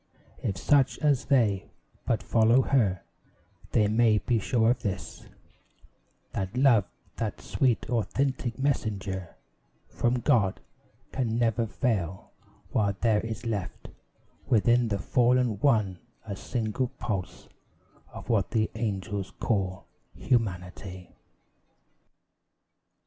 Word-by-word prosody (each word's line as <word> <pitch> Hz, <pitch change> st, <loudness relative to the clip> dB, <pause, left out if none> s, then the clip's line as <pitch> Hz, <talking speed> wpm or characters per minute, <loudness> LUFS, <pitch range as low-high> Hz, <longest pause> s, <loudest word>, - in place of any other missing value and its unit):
If 95 Hz, -, -2 dB
such 135 Hz, +5 st, +3 dB
as 145 Hz, -4 st, +1 dB
they 110 Hz, -9 st, +2 dB, 0.4 s
But 110 Hz, -6 st, +1 dB
follow 115 Hz, +8 st, +4 dB
her, 105 Hz, -11 st, +1 dB, 0.7 s
they 105 Hz, -2 st, +3 dB
may 110 Hz, 0 st, +4 dB
be 115 Hz, +2 st, +1 dB
sure 115 Hz, +1 st, +2 dB
of 125 Hz, -, -2 dB
this, 100 Hz, -5 st, -5 dB, 1.0 s
That 95 Hz, +4 st, -4 dB
Love, 125 Hz, -7 st, +5 dB, 0.3 s
that 110 Hz, -2 st, -3 dB
sweet 125 Hz, -4 st, 0 dB
authentic 125 Hz, +1 st, -1 dB
messenger 100 Hz, -9 st, -2 dB, 0.5 s
From 120 Hz, +1 st, 0 dB
God, 115 Hz, -10 st, +2 dB, 0.5 s
can 115 Hz, -4 st, -1 dB
never 115 Hz, -1 st, +1 dB
fail 95 Hz, -7 st, -2 dB, 0.4 s
while 100 Hz, -3 st, +1 dB
there 110 Hz, -2 st, +3 dB
is 115 Hz, +1 st, -6 dB
left 105 Hz, -5 st, -4 dB, 0.6 s
Within 120 Hz, 0 st, +3 dB
the 100 Hz, -2 st, -1 dB
fallen 120 Hz, +1 st, +2 dB
one 105 Hz, -9 st, +2 dB, 0.3 s
a 100 Hz, -3 st, -5 dB
single 115 Hz, +4 st, -2 dB
pulse 100 Hz, -6 st, -4 dB, 0.6 s
Of -, -, -10 dB
what 105 Hz, -6 st, +1 dB
the 110 Hz, -1 st, 0 dB
angels 100 Hz, -3 st, -3 dB
call 95 Hz, -4 st, -1 dB, 0.3 s
humanity. 90 Hz, -4 st, -2 dB
110 Hz, 105 wpm, -28 LUFS, 100-120 Hz, 1.0 s, Love